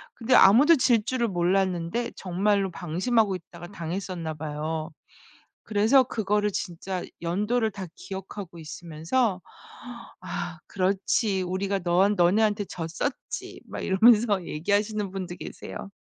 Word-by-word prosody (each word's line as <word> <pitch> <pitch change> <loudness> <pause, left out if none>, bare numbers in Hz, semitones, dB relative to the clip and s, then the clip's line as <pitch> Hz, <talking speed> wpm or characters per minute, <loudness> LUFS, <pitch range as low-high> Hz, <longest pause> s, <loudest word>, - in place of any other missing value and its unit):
근데 245 +2 0
아무도 255 +11 +7
질 235 -4 +3
줄을 240 +1 0
몰랐는데 185 +3 0
정말로 195 +1 0
방심하고 190 +5 0
있다가 175 -1 -10
당했었나 175 -2 -4
봐요. 155 +1 -4 0.7
그래서 220 +5 +4
그거를 210 -3 0
진짜 185 0 -4 0.2
연도를 210 +7 0
다 190 -1 -6
기억하고 190 -2 -8
있으면서 170 +7 -2 0.8
"아 175 -2 -5
그렇지. 195 +1 0
우리가 190 +2 -1
너한 185 +4 +3
너네한테 205 +3 +3
졌었지." 170 - -5
막 - - -7
이러면서 210 -1 +4
얘기하시는 205 +5 -1
분도 185 -2 -5
계세요. 195 - -8
195 Hz, 295 characters per minute, -26 LUFS, 175-210 Hz, 0.8 s, 아무도